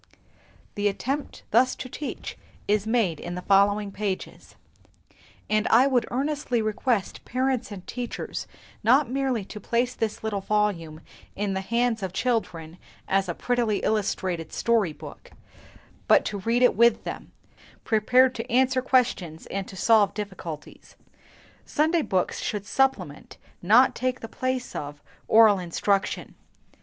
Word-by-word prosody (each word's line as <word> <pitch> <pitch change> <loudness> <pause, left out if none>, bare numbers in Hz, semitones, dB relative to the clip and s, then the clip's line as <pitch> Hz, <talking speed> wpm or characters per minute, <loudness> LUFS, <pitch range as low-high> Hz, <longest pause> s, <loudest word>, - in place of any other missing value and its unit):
The 205 0 0
attempt 270 +8 -3
thus 250 +4 +4
to - - -7
teach 290 +3 -6 0.3
is 210 0 +1
made 220 -9 +1
in 175 0 -6
the 180 - -6
following 200 +1 +3
pages; 195 -2 -5 0.9
and 215 0 +1
I 245 +4 +5
would 255 -4 +1
earnestly 275 -1 -1
request 215 0 -1
parents 255 -2 -1
and 190 -3 -8
teachers 245 -1 -5 0.4
not 250 +3 +4
merely 260 -6 -1
to 210 - -9
place 240 +4 0
the 225 - 0 0.2
little 210 -3 -2
volume 190 -7 -1 0.3
in 200 -1 -2
the 190 - -2
hands 235 +2 0
of 190 -2 -4
children 180 -9 -2 0.3
as 195 -1 +1
a 170 - -2
prettily 240 -4 0
illustrated 190 -6 -1
story 225 -7 +1
book, - - -12 0.7
but - - +5
to 205 - -3
read 230 +5 +1
it 250 - +5
with 235 +1 +4
them, - - -7 0.5
prepared 250 +4 +3
to 230 - -6
answer 255 +1 +3
questions 230 -11 0
and 195 -1 -3
to - - -10
solve 210 +1 +3
difficulties. 190 -7 -8 0.7
Sunday 320 +3 +1
books 185 -10 -1
should 205 -2 -3
supplement, 210 - -1 0.2
not 245 +8 +5
take 255 +1 -2
the 225 - -6
place 255 +1 -3
of, 145 0 -6 0.3
oral 215 -3 +6
instruction. 195 +3 -1
220 Hz, 140 wpm, -25 LUFS, 195-250 Hz, 0.9 s, oral